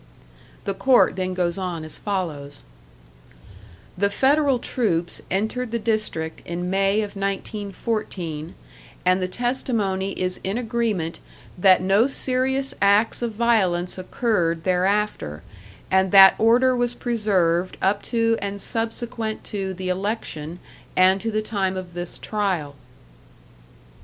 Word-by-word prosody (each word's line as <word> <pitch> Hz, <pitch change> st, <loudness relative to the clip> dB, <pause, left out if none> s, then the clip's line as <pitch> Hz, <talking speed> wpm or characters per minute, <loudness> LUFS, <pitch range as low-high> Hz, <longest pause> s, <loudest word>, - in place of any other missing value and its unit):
The 195 Hz, -, -1 dB
Court 255 Hz, +1 st, +4 dB
then 185 Hz, -1 st, -2 dB
goes 180 Hz, +1 st, -1 dB
on 175 Hz, -4 st, -3 dB
as 155 Hz, -, -8 dB
follows: 155 Hz, -8 st, -4 dB, 1.3 s
"The 200 Hz, +2 st, +1 dB
Federal 275 Hz, +4 st, +3 dB
troops 175 Hz, -9 st, -1 dB
entered 220 Hz, +6 st, -1 dB
the 235 Hz, -, -1 dB
district 215 Hz, -8 st, -2 dB
in 175 Hz, +1 st, -4 dB
May 195 Hz, +2 st, +2 dB
of 205 Hz, -1 st, -5 dB
1914, 195 Hz, -4 st, -4 dB, 0.5 s
and 185 Hz, +1 st, +3 dB
the 185 Hz, -, 0 dB
testimony 205 Hz, -4 st, -1 dB
is 185 Hz, 0 st, -1 dB
in 195 Hz, +4 st, -2 dB
agreement 225 Hz, -8 st, -1 dB, 0.4 s
that 185 Hz, 0 st, +5 dB
no 200 Hz, +6 st, +4 dB
serious 265 Hz, 0 st, -1 dB
acts 200 Hz, +4 st, +3 dB
of 235 Hz, -2 st, -2 dB
violence 190 Hz, -6 st, +1 dB
occurred 180 Hz, -5 st, 0 dB
thereafter, 185 Hz, -, 0 dB, 0.5 s
and 190 Hz, 0 st, +3 dB
that 195 Hz, -1 st, +9 dB
order 245 Hz, +3 st, +4 dB
was 245 Hz, 0 st, 0 dB
preserved 185 Hz, -7 st, 0 dB
up 200 Hz, +2 st, +1 dB
to 230 Hz, -1 st, +1 dB
and 200 Hz, 0 st, -4 dB
subsequent 225 Hz, 0 st, -3 dB
to 195 Hz, -2 st, -3 dB
the 185 Hz, 0 st, -4 dB
election, 180 Hz, -5 st, -3 dB, 0.4 s
and 185 Hz, +1 st, +4 dB
to 225 Hz, -, -2 dB
the 215 Hz, -1 st, -1 dB
time 190 Hz, -3 st, -1 dB
of 180 Hz, -2 st, -7 dB
this 175 Hz, 0 st, -4 dB
trial. 190 Hz, -9 st, -2 dB
195 Hz, 125 wpm, -23 LUFS, 180-225 Hz, 1.3 s, that